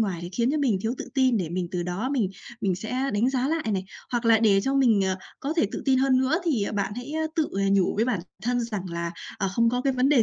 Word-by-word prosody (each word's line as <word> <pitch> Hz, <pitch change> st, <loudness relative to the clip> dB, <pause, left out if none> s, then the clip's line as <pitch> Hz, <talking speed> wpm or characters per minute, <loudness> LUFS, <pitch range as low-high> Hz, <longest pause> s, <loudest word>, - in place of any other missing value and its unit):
ngoài, 195 Hz, -6 st, 0 dB
thì 175 Hz, -, -5 dB
khiến 235 Hz, +5 st, +1 dB
cho 310 Hz, -, 0 dB
mình 250 Hz, -9 st, +2 dB
thiếu 225 Hz, +2 st, -1 dB
tự -, -, -6 dB
tin 260 Hz, -3 st, +3 dB
để 175 Hz, -6 st, -1 dB
mình 175 Hz, 0 st, -2 dB
từ 180 Hz, -1 st, -2 dB
đó, 180 Hz, +8 st, -2 dB
mình 220 Hz, -9 st, +1 dB, 0.3 s
mình 195 Hz, -4 st, +1 dB
sẽ 250 Hz, +7 st, -2 dB
đánh 230 Hz, +6 st, +2 dB
giá 260 Hz, +1 st, 0 dB
lại 325 Hz, 0 st, 0 dB
này. 190 Hz, -1 st, -1 dB, 0.3 s
Hoặc 240 Hz, 0 st, 0 dB
là 225 Hz, -1 st, +6 dB
để 205 Hz, -3 st, +4 dB
cho 270 Hz, +6 st, -1 dB
mình, 240 Hz, -7 st, +4 dB
ờ, 190 Hz, 0 st, 0 dB, 0.2 s
có 280 Hz, -, -2 dB
thể 220 Hz, -, +3 dB
tự -, -, -4 dB
tin 265 Hz, -2 st, +3 dB
hơn 265 Hz, -1 st, +3 dB
nữa, 265 Hz, +5 st, +2 dB
thì, 275 Hz, -12 st, +1 dB
à, -, -, -2 dB
bạn 200 Hz, -1 st, -1 dB
hãy, 245 Hz, +5 st, -6 dB
ờ, 315 Hz, 0 st, 0 dB
tự, 315 Hz, -, +2 dB
à, 200 Hz, -, +1 dB
nhủ 195 Hz, -2 st, +3 dB
với 220 Hz, -, +3 dB
bản 240 Hz, -7 st, 0 dB, 0.2 s
thân 245 Hz, +1 st, +1 dB
rằng 220 Hz, -5 st, -3 dB
là, 170 Hz, 0 st, -3 dB, 0.3 s
ờ, 195 Hz, -, 0 dB
không 230 Hz, +3 st, +3 dB
có 245 Hz, +1 st, 0 dB
cái 275 Hz, 0 st, +2 dB
vấn 255 Hz, +1 st, +2 dB
đề 275 Hz, -5 st, +5 dB
230 Hz, 295 wpm, -26 LUFS, 195-265 Hz, 0.3 s, là